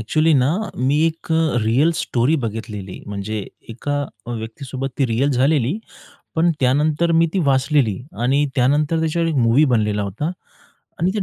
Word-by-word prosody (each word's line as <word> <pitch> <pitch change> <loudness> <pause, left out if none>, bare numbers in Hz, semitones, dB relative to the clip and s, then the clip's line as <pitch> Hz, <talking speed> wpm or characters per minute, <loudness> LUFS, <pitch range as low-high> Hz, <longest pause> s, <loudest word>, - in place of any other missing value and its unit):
Actually 155 +8 +2
ना 130 -1 +3 0.3
मी 135 +4 +1
एक 165 0 -3
अ, 160 -5 +2
real 135 +9 +3
story 130 +7 +1
बघितलेली 105 -3 -6
म्हणजे 100 +1 -4 0.2
एका 145 +5 -2 0.3
अ, - - -6
व्यक्तीसोबत 130 +4 -5
ती 135 - +3
रिअल 125 +5 +1
झालेली. 140 - +2 0.6
पण 170 +2 +4
त्यानंतर 150 +6 +2
मी 165 +1 +4
ती 195 - +2
वाचलेली 135 -5 +2 0.2
आणि 140 +4 +2
त्यानंतर 145 +5 +2
त्याच्यावर 165 +1 0
एक 160 - -1
मूव्ही 120 +4 +4
बनलेला 105 -2 +1
होता. 110 - -3 0.7
आणि 180 +3 +2
त्या 210 - -1
135 Hz, 155 wpm, -20 LUFS, 115-155 Hz, 0.7 s, पण